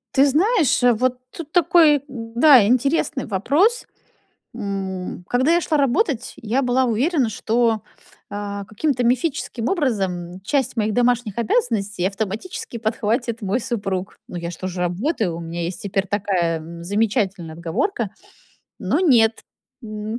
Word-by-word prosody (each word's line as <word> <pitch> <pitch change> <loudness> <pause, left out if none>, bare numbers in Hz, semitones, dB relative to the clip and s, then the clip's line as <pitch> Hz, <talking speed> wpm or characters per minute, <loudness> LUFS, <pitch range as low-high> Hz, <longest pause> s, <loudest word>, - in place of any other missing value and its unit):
Ты 275 +2 +6
знаешь, 330 - +2 0.2
вот 255 0 +1 0.2
тут 310 -3 -8
такой, 330 -5 +5
да, 245 +1 +4
интересный 265 +3 +1
вопрос. 295 - +1 0.7
М, 190 -4 -4
когда 260 +6 +2
я 345 - +4
шла 310 -2 0
работать, 275 - +1
я 230 +5 -1
была 255 0 +2
уверена, 255 +3 +1
что, 225 0 +1 0.5
а, 205 0 -5
каким-то 245 +5 -1
мифическим 245 -1 0
образом 190 - -1
часть 260 -2 0
моих 215 -1 0
домашних 245 -3 +1
обязанностей 210 - 0
автоматически 215 - -5
подхватит 230 +1 -1
мой 205 +4 0
супруг. 195 -5 -3
Ну, 175 - -6
я 170 0 -4
ж 175 - -7
тоже 185 -1 -5
работаю, 180 - -1
у 170 - -6
меня 170 +1 -5
есть 175 +1 -4
теперь 195 -1 -1
такая 180 -5 0 0.2
замечательная 200 -4 -1
отговорка. 170 - -2 0.7
Но 225 - 0
нет. 230 -10 +4 0.4
М, 215 +1 -5
225 Hz, 130 wpm, -21 LUFS, 195-270 Hz, 0.7 s, Ты